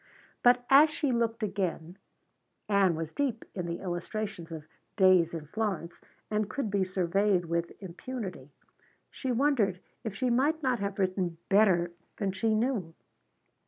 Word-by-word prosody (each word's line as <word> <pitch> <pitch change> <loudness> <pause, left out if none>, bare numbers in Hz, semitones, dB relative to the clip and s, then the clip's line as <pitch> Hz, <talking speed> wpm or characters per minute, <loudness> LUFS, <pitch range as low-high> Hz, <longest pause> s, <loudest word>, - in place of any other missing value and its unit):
But 245 0 +5
as 290 +3 +8
she 300 -2 -1
looked 230 -1 0
again 185 -4 -2 0.7
Ann 195 -4 +3
was 160 0 -4
deep 260 -6 -1
in 180 -3 -4
the 170 0 -4
illustrations 180 0 -4
of 160 -2 -6 0.3
"Days 185 -4 +5
in 165 -3 -6
Florence" 195 -2 -3 0.3
and 210 -1 0
could 255 -6 -3
be 200 -1 +2
surveyed 185 0 +1
with 170 0 -1
impunity 185 - -6 0.6
she 260 - -3
wondered 235 -8 +2 0.2
if 220 -3 -4
she 250 +4 0
might 295 +6 +2
not 255 -3 +1
have 200 -1 -3
written 185 -3 -1
better 190 -4 +4 0.3
than 200 -3 -1
she 220 +3 +1
knew. 215 -8 -1
200 Hz, 145 wpm, -29 LUFS, 175-235 Hz, 0.7 s, as